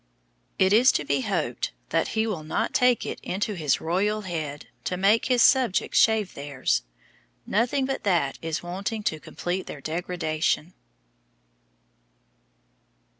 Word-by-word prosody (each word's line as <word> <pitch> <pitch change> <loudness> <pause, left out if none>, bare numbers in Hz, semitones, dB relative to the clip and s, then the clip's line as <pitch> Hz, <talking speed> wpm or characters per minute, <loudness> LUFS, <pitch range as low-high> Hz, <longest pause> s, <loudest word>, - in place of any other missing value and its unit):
It 190 +1 +4
is 245 +4 +6
to 150 - -1
be 140 -1 +1
hoped - - -2 0.2
that - - +1
he 220 - +3
will 195 -8 -3
not 155 - -2
take 250 -1 +3
it - - -5
into 205 +3 -2
his 155 -7 0
royal 200 +6 0
head 155 - -5 0.2
to 180 - -1
make 200 +4 +3
his 250 -2 +4
subjects 255 -8 +3
shave 220 -4 +3
theirs; 140 -2 -1 0.6
nothing 245 +6 +1
but 270 0 -2
that 170 -9 +1
is 165 0 -3
wanting 200 +5 -4
to 155 -5 -1
complete 180 +4 -4
their 145 - -7
degradation. 160 +1 -2
185 Hz, 135 wpm, -25 LUFS, 155-215 Hz, 0.6 s, is